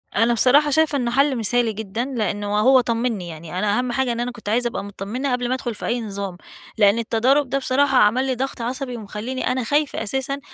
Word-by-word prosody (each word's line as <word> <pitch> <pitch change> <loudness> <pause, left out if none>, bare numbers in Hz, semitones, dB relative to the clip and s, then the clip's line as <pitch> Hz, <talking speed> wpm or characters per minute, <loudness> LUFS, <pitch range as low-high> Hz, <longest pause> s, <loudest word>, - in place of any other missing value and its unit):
أنا 230 +3 +3
بصراحة 275 +6 +4
شايفة 315 0 +2
إنه 240 -3 -1
حل 275 +2 +3
مثالي 230 +1 +1
جدًا، 220 +3 -4
لإنه 205 -5 -2
وهو 255 +5 +5
طمّني 230 -5 -2
يعني، 165 +2 -7
أنا 205 +1 +1
أهم 250 0 -1
حاجة 260 0 0
إن 235 - -3
أنا 245 +1 -2
كنت 235 -4 -8
عايزة 240 +3 +2
أبقى 235 - -4
متطمّنة 205 +7 -4
قبل 245 0 -1
ما 255 - +1
ادخل 240 -3 -4
في - - -7
أي 240 +1 -1
نظام، 200 -4 -5 0.4
لإن 205 +1 +4
التضارب 250 +5 +2
ده 275 - 0
بصراحة 270 0 +2
عَمل 240 +5 +4
لي 260 -1 -1
ضغط 265 0 -4
عصبي 250 +1 -4
ومخلّيني 220 +4 -5
أنا 255 0 0
خايفة 290 0 0
أساسًا 270 +5 -2
240 Hz, 215 wpm, -22 LUFS, 210-260 Hz, 0.4 s, وهو